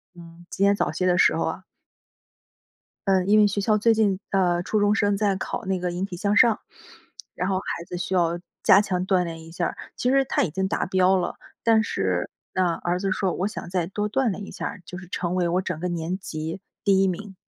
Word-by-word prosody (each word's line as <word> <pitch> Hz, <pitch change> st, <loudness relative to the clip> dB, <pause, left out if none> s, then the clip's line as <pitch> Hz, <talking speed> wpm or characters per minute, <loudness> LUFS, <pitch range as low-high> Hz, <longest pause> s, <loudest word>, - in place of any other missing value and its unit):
嗯， 170 Hz, 0 st, -14 dB
今 195 Hz, -, +1 dB
天 200 Hz, 0 st, +4 dB
早 -, -, 0 dB
些 175 Hz, +4 st, -2 dB
的 180 Hz, -1 st, +3 dB
时 -, -, +5 dB
候 -, -, 0 dB
啊 -, -, -4 dB, 1.5 s
呃， 190 Hz, -2 st, +3 dB
因 210 Hz, +2 st, +4 dB
为 210 Hz, -, +6 dB
学 205 Hz, 0 st, -2 dB
校 215 Hz, 0 st, +3 dB
最 225 Hz, +2 st, +4 dB
近， 205 Hz, -4 st, +1 dB
呃， 175 Hz, -3 st, +2 dB
初 215 Hz, +3 st, 0 dB
中 205 Hz, 0 st, +3 dB
生 205 Hz, -2 st, +2 dB
在 200 Hz, -1 st, +1 dB
考 190 Hz, -, -4 dB
那 190 Hz, -1 st, -1 dB
个 180 Hz, 0 st, -1 dB
引 175 Hz, +2 st, -3 dB
体 195 Hz, -2 st, -6 dB
向 205 Hz, +4 st, +1 dB
上， 225 Hz, -2 st, +5 dB, 0.7 s
然 180 Hz, -, -2 dB
后 195 Hz, -, +1 dB
孩 185 Hz, -, -4 dB
子 180 Hz, -, -6 dB
需 180 Hz, +1 st, -4 dB
要 170 Hz, -1 st, +2 dB, 0.2 s
加 195 Hz, -, +7 dB
强 185 Hz, -3 st, -2 dB
锻 185 Hz, -2 st, +2 dB
炼 165 Hz, -1 st, -6 dB
一 165 Hz, -, -12 dB
下 175 Hz, +1 st, -2 dB
儿。 -, -, -7 dB, 0.2 s
其 250 Hz, -, 0 dB
实 270 Hz, 0 st, +3 dB
他 -, -, +1 dB
已 175 Hz, -, 0 dB
经 190 Hz, +4 st, -1 dB
达 -, -, -1 dB
标 185 Hz, 0 st, +3 dB
了， 180 Hz, -, -2 dB, 0.3 s
但 225 Hz, -1 st, +4 dB
是 95 Hz, -, -1 dB, 0.2 s
那 180 Hz, -3 st, +1 dB
儿 175 Hz, +2 st, -2 dB
子 195 Hz, 0 st, -1 dB
说 190 Hz, -1 st, 0 dB
我 190 Hz, -, -1 dB
想 215 Hz, -5 st, -7 dB
再 180 Hz, -2 st, 0 dB
多 210 Hz, +2 st, -3 dB
锻 265 Hz, +2 st, +1 dB
炼 200 Hz, +1 st, -5 dB
一 -, -, -9 dB
下 -, -, -5 dB
儿， 185 Hz, -, -6 dB
就 180 Hz, -, -8 dB
是 185 Hz, -2 st, -11 dB
成 180 Hz, -1 st, -2 dB
为 175 Hz, -1 st, +1 dB
我 180 Hz, +2 st, +1 dB
整 175 Hz, -4 st, -4 dB
个 180 Hz, -, -2 dB
年 175 Hz, +1 st, -3 dB
级 160 Hz, -1 st, -5 dB, 0.2 s
第 195 Hz, -1 st, +4 dB
1 -, -, +4 dB
名。 195 Hz, +2 st, -5 dB
185 Hz, 255 characters per minute, -24 LUFS, 175-205 Hz, 1.5 s, 加